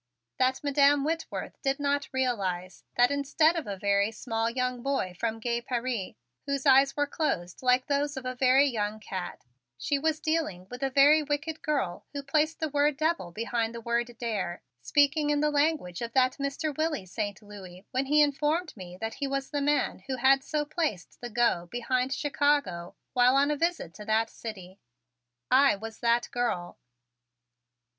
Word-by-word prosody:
That 260 +2 +1
Madam 285 0 +4
Whitworth 325 +2 -4
did 275 0 0
not 285 0 0
realize 195 -9 -2
that 245 +2 +5
instead 285 +4 +2
of 330 - -3
a 200 -1 -4
very 200 +1 +2
small 225 0 -2
young 250 0 -2
boy 270 -9 -1
from 225 -1 -2
gay 235 +1 -1
Paris, 240 -5 -3 0.3
whose 280 0 -2
eyes 275 +1 +5
were 290 - +2
closed 185 - -2
like 250 0 +3
those 285 0 -1
of 260 - -6
a 255 - -2
very 260 +2 +4
young 215 -5 -2
cat, 190 -3 -6 0.3
she 280 - -1
was 315 +1 0
dealing 310 - -1
with 250 +1 -7
the 270 - +1
very 285 +3 +6
wicked 300 +2 -3
girl 270 -13 -2
who 285 -1 -4
placed 305 +3 +1
the 315 - 0
word 290 0 +2
"devil" 315 - 0
behind 230 +3 -2
the - - -5
word 235 0 -2
"dare," 205 -8 -3 0.2
speaking 290 - +2
in 295 0 +2
the 300 0 +2
language 290 - 0
of 235 0 -4
that 255 -1 +3
Mr. 280 +2 -2
Willie 310 -9 -1
Saint 205 +1 -4
Louis 195 -3 -12
when 265 +1 -1
he 300 +1 +5
informed 300 +4 0
me 180 -3 -10
that 225 +3 -4
he 280 - -3
was 275 0 -3
the 290 -1 -1
man 290 +1 +1
who 265 - -1
had 270 +2 +4
so 300 0 -1
placed 295 - -3
the 240 - -5
"go" 225 -7 +1
behind 250 +2 -1
Chicago 285 - 0 0.2
while 250 0 +5
on 280 +2 +3
a - - +1
visit 335 - -1
to 210 - -10
that 220 +1 +1
city. 190 -4 -9 0.7
I 270 -1 +6
was 220 +2 -8
that 235 0 +2
girl. 230 -8 -2
260 Hz, 180 wpm, -28 LUFS, 220-290 Hz, 0.7 s, very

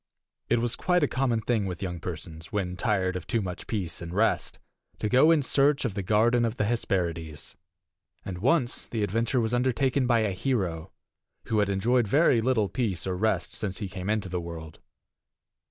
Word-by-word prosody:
It 120 - +3
was 120 -1 0
quite 180 -2 +2
a - - +4
common 125 -4 0
thing 110 -3 0
with 90 +1 -5
young 90 -2 -4
persons, 80 -1 -7
when 95 -4 -2
tired 95 -3 0
of 90 - -5
too 115 - +1
much 90 -4 -5
peace 95 -7 -3
and 85 -1 -6
rest, 105 +5 +1 0.4
to - - -1
go 130 +8 +5
in 160 -3 +4
search 140 +2 +2
of 115 - -1
the 100 - -2
garden 115 +5 +3
of 115 0 -1
the - - +1
Hesperides. 85 -8 -2 0.7
And 90 -2 -5
once 130 - +1
the 110 -3 -2
adventure 115 +5 0
was 115 0 0
undertaken 130 +1 +1
by 120 -2 +3
a 105 -2 +1
hero, 95 -7 -2 0.6
who 110 -2 +2
had 105 -1 +2
enjoyed 115 +4 +2
very 135 0 +4
little 115 -4 +2
peace 100 -8 -2
or 95 -1 -1
rest 95 -3 0
since 95 -3 -3
he 100 - -3
came 95 +1 -5
into 105 -3 0
the 90 -1 -3
world. 80 -2 -8
105 Hz, 190 wpm, -27 LUFS, 90-120 Hz, 0.7 s, go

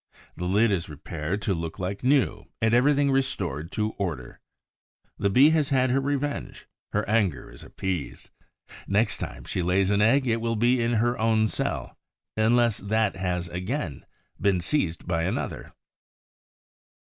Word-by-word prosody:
The 90 - -4
lid 105 +4 +3
is 85 -4 -1
repaired 80 +6 -4
to 100 - +1
look 80 -2 -4
like 95 +4 -4
new 135 +1 +2
and 110 0 +2
everything 140 +3 +4
restored 90 - -1
to 110 -1 -1
order. 80 -11 -4 0.8
The 100 - +2
Bee 135 +10 +6
has 155 -3 +2
had 130 -2 +2
her 135 - +3
revenge; 145 +1 -3 0.3
her - - -1
anger 105 -7 0
is - - -13
appeased. 90 -6 -5 0.6
Next 105 +3 +1
time - - -6
she - - -3
lays 95 +3 +2
an 100 0 +2
egg 130 +6 +4
it 115 -2 0
will 115 0 0
be 120 +3 +2
in 115 +1 +1
her 120 +2 +1
own 110 -1 +3
cell, 110 - -3 0.4
unless 115 0 +3
that 110 +1 0
has 90 -2 -2
again 90 - -4 0.4
been 100 -2 +3
seized 85 - -1
by 85 -2 0
another. 90 +3 -3
105 Hz, 155 wpm, -26 LUFS, 90-120 Hz, 0.8 s, Bee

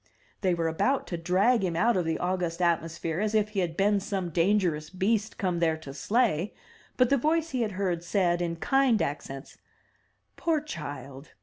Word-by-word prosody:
'' - - -36
They 185 -3 +2
were 165 -1 0
about 255 +12 +1
to 175 - -2
drag 195 +7 +2
him 175 -3 -1
out 230 +7 +3
of 180 -2 +1
the 160 0 0
august 180 -2 -2
atmosphere 165 -1 0
as 215 +1 0
if 215 -1 +2
he 210 -2 -2
had 170 -3 -2
been 205 +1 +3
some 190 -3 -3
dangerous 170 -3 +1
beast 205 +4 0
come 180 -3 -1
there 160 -2 +2
to 145 -4 -9
slay, 205 - 0 0.4
but 250 0 +3
the 280 - +5
voice 320 +4 +1
he 255 -2 -1
had 215 -3 -1
heard 185 -3 -1
said 175 -1 +1
in 170 -1 -1
kind 265 +5 +2
accents, 135 -1 -5 0.8
"Poor 330 -2 +1
child! 145 - -8
185 Hz, 190 wpm, -28 LUFS, 165-215 Hz, 0.8 s, the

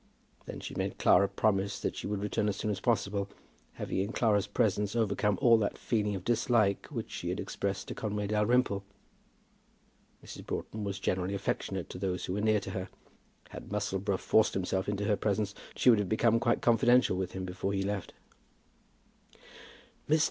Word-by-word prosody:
Then - - -6
she - - -6
made - - -3
Clara 100 - +5
promise 100 0 0
that - - -2
she - - -5
would 100 -1 -2
return 105 0 0
as 100 - -1
soon 105 - -2
as 100 - -3
possible, 100 -2 0 0.4
having - - -3
in 100 +3 -1
Clara's 105 -5 +2
presence 105 0 0
overcome 105 -2 +1
all 115 -2 +6
that 105 - -1
feeling 105 -3 0
of 90 - -5
dislike 115 -4 +2
which - - -5
she - - -4
had - - -2
expressed 100 -1 -3
to - - -4
Conway 105 -1 -3
Dalrymple. 105 0 +2 1.4
Mrs. - - -9
Broughton 110 -1 -4
was 100 -1 -3
generally 95 0 -1
affectionate 95 -1 -2
to - - -7
those 90 -1 -2
who 90 - -3
were 105 - -1
near 110 0 +3
to 95 - -6
her. 95 0 -4 0.6
Had - - -9
Musselboro 95 0 -1
forced 110 +3 +3
himself 95 +1 -1
into 105 0 -1
her 105 - +3
presence, 105 0 -1 0.2
she 125 - +5
would 110 - +4
have 100 -3 -1
become 115 +1 +3
quite 120 0 +1
confidential 120 -1 +4
with 90 -1 -3
him 95 -1 -4
before 95 +2 -3
he 95 -1 0
left 100 -1 -3 1.2
her. - - -25 0.8
"Mr. - - +2
100 Hz, 185 wpm, -31 LUFS, 95-110 Hz, 1.4 s, all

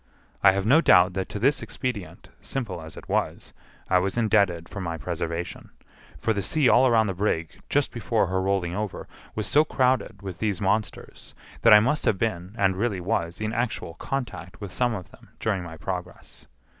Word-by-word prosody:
I 95 -1 +7
have 100 0 -1
no 140 +9 +6
doubt 90 - +5
that 95 0 -3
to - - -5
this 135 +7 +2
expedient, 100 -11 -5
simple 110 -10 -4
as 80 0 -10
it - - -10
was, - - -2 0.3
I 90 - +4
was 95 +4 -2
indebted 100 -7 +2
for 100 - -7
my 85 -2 -3
preservation; 85 +2 -4 0.5
for 115 - 0
the 100 - -1
sea 145 - +2
all 130 +2 +6
round 110 -2 +4
the 95 - -1
brig, 90 -4 -2
just - - +1
before - - 0
her 95 +1 -1
rolling 95 -3 0
over, 105 -1 -4 0.3
was 110 - -2
so 145 +8 +4
crowded 130 -8 0
with 95 -3 -6
these 105 -5 -1
monsters, 105 +2 -2 0.3
that 115 - +6
I 105 - +10
must 150 +7 0
have 100 - +2
been, 95 -2 -2
and 95 -4 +2
really 105 -2 0
was, 85 -1 -2
in 110 +1 -2
actual 120 -8 -2
contact 100 - -5
with 100 -3 -7
some 120 +2 +1
of 90 -4 -8
them - - -18
during 105 -4 0
my 85 -2 -8
progress. 90 +2 -7
100 Hz, 195 wpm, -25 LUFS, 90-115 Hz, 0.5 s, I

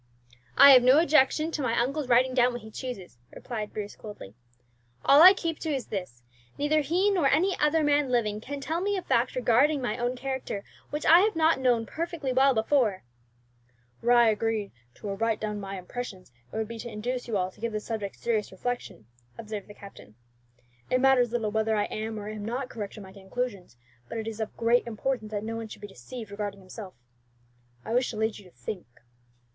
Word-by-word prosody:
"I 280 - +10
have 255 -2 +9
no 255 +4 +6
objection 310 0 +3
to 305 - -3
my 235 -3 +1
uncle's 275 +4 -1
writing 255 +1 +4
down 250 -1 +3
what 240 -2 -6
he 220 - -11
chooses," 210 - -7 0.2
replied 215 -4 -5
Bruce 205 -1 -6
coldly. 205 - -10 0.7
"All 280 - +7
that 330 - +10
I 375 - +11
keep 330 -4 -3
to 320 - -4
is 270 -5 -2
this, 180 - -6 0.3
neither 300 +2 +2
he 360 +7 +2
nor 350 -8 +2
any 355 +8 +2
other 305 +1 +3
man 290 -2 +2
living 215 -4 0
can 285 +4 -6
tell 320 +5 -2
me 405 +1 0
a 370 - -4
fact 240 +2 +1
regarding 255 +4 +3
my 245 -2 -3
own 245 +1 -1
character 260 -5 -4 0.3
which 295 - -4
I 335 +2 +8
have 420 +1 +2
not 320 -2 +3
known 245 -3 +2
perfectly 320 -2 -3
well 265 +1 +4
before." 220 -3 +1 1.0
"Were 240 +1 +3
I 240 -1 +6
to 220 - +5
agree 215 -1 -2 0.2
to - - -9
write 220 +2 -1
down 210 -1 -3
my 195 -1 -6
impressions, 190 - -7 0.2
it - - -6
would 220 -1 -1
be 230 0 -8
to 235 - -6
induce 245 +4 -4
you 220 -3 0
all 185 0 -1
to - - -21
give 230 0 -2
the 215 - -2
subject 210 -2 -5
serious 220 -3 -1
reflection," 245 - -5 0.3
observed 215 -3 -6
the 205 - -12
captain. 195 - -13 0.7
"It 255 - +2
matters 255 -3 +4
little 225 -3 -1
whether 220 +1 +1
I 205 - +2
am 220 0 -4
or 205 - -7
am 215 -1 -6
not 250 +4 -3
correct 210 -3 -7
in 210 - -8
my 190 0 -13
conclusions; 195 - -5 0.3
but - - -5
it 220 0 -4
is 225 -1 -5
of 220 -1 -5
great 235 +1 +2
importance 235 0 -3
that 210 -1 -4
no 225 +1 -4
one 225 -1 -5
should - - -11
be - - -5
deceived 205 - -10
regarding 200 -1 -5
himself. 190 +1 -10 0.9
I 225 - -3
wish 250 +1 +2
to 220 - -6
lead 220 0 -1
you 205 - -15
to - - -30
think." 170 - -6
235 Hz, 215 wpm, -27 LUFS, 210-270 Hz, 1.0 s, I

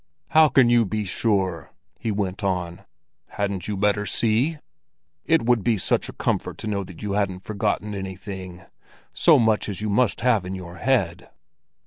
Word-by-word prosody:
"How 155 -1 +6
can 130 -4 +5
you 120 -1 +4
be 105 +1 -2
sure?" 95 - -1 0.3
he 115 - -3
went 100 -2 -2
on. 90 -3 -2 0.4
"Hadn't 100 -3 -3
you 105 -2 -2
better 105 +1 +1
see? 120 +8 +1 0.7
It 165 -4 +3
would 120 -3 +2
be 115 -3 +2
such 95 - 0
a - - -8
comfort - - -2
to - - -6
know 100 -2 -1
that 90 -1 -11
you 105 - -2
hadn't 100 -2 -1
forgotten 105 0 -2
anything—so 95 -1 -2
much 110 -2 +2
as 100 - -4
you 105 -1 -2
must 110 +1 +1
have 115 -5 +3
in 95 +1 -5
your 90 -1 -9
head." 95 -10 0
100 Hz, 165 wpm, -24 LUFS, 95-110 Hz, 0.7 s, How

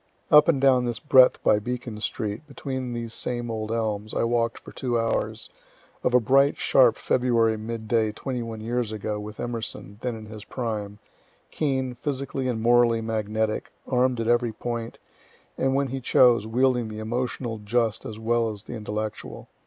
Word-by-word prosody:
Up 150 0 +8
and 160 -5 +3
down 130 -2 +4
this 120 -2 -2
breadth 130 -3 +5
by 105 - +4
Beacon 120 -1 -5
street, 105 +5 -3
between 130 -3 -5
these 115 -1 -4
same 120 -1 -2
old 110 -1 -4
elms, 110 -2 -2
I - - +1
walk'd 115 0 +1
for - - -12
two 120 -2 -1
hours, 115 0 -2 0.5
of 125 - +2
a - - +8
bright 135 +5 +3
sharp 125 -4 +4
February 115 -3 +2
mid 110 0 -6
day 110 -1 +2
twenty 125 +3 -4
one 115 -1 -6
years 120 0 -1
ago, 105 0 -3
with 105 +1 -8
Emerson, 115 -3 -5
then 125 -2 -2
in 110 -1 -9
his 110 -1 -9
prime, 105 -5 -4 0.5
keen, 130 -4 -1
physically 135 0 -3
and 120 -3 -1
morally 120 -1 +4
magnetic, 110 -1 -2 0.2
arm'd 125 -1 +2
at 115 - -1
every 120 -1 +2
point, 115 0 -5 0.6
and 135 0 +1
when 140 -1 +1
he 135 +1 -4
chose, 120 -3 +4
wielding 125 0 +2
the 110 0 -7
emotional 120 +1 -3
just 110 +1 0
as 110 - -7
well 115 +1 +1
as 105 -2 -7
the - - -8
intellectual. 110 -1 -5
115 Hz, 175 wpm, -25 LUFS, 110-125 Hz, 0.6 s, Up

